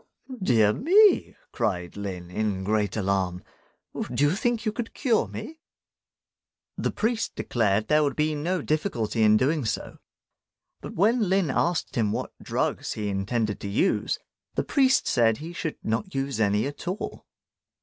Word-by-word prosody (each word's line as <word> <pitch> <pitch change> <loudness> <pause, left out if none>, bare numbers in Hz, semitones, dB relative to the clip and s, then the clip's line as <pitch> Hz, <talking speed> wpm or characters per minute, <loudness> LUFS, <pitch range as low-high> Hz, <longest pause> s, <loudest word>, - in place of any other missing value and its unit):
"Dear 110 - +4
me!" 395 - +4 0.2
cried 90 -4 -2
Lin, 95 -4 -6
in 100 -1 -1
great 105 +1 0
alarm, 95 -3 -1 0.7
"do - - +1
you 145 - +4
think 235 +1 0
you 215 - +1
could 225 +2 -5
cure 240 -6 +2
me?" 320 +1 -8 1.2
The - - -1
priest 225 0 -1
declared 110 -3 0
there 150 0 +4
would 140 -3 0
be 155 0 +1
no 165 +3 -1
difficulty 135 - -1
in 110 0 +6
doing 145 +5 +1
so; 110 - -4 0.8
but - - -8
when 215 +2 +3
Lin 190 -6 +2
asked 175 -1 0
him 110 -4 +1
what - - -3
drugs - - -1
he 105 -1 -3
intended 105 +2 -1
to - - -5
use, 115 - +1 0.4
the - - +1
priest 265 -2 +3
said 115 -3 +3
he 165 +3 -8
should 160 -2 -4
not 115 - -2
use 135 -3 -2
any 105 0 +2
at 145 +5 -6
all. 185 +4 -4
130 Hz, 155 wpm, -26 LUFS, -, 1.2 s, in